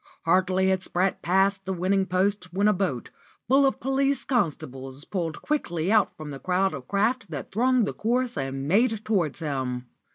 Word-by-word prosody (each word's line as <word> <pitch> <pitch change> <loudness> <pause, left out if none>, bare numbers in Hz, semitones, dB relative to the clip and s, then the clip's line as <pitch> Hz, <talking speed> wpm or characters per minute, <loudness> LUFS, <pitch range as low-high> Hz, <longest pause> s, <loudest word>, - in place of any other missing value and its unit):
Hardly 185 +2 +3
had 190 -1 +1
Spratt 185 +1 -1
passed 195 +2 +2
the 190 - 0
winning 190 +2 +1
post 185 0 0
when 200 +4 +2
a 210 - +5
boat, 180 - -2 0.4
full 270 +3 +5
of 270 - -1
police 270 +2 0
constables, 135 - -2
pulled 170 -5 -4
quickly 175 - -1
out 215 -2 +3
from 155 -1 -7
the 135 - -7
crowd 185 +2 +1
of 130 -3 -7
craft 220 +2 0
that 145 -4 -6
thronged 250 +2 +3
the - - -3
course 245 +2 0
and 135 +1 -3
made 220 +4 +2
towards 180 -10 0
him. 130 -5 -3
190 Hz, 175 wpm, -26 LUFS, 160-220 Hz, 0.4 s, a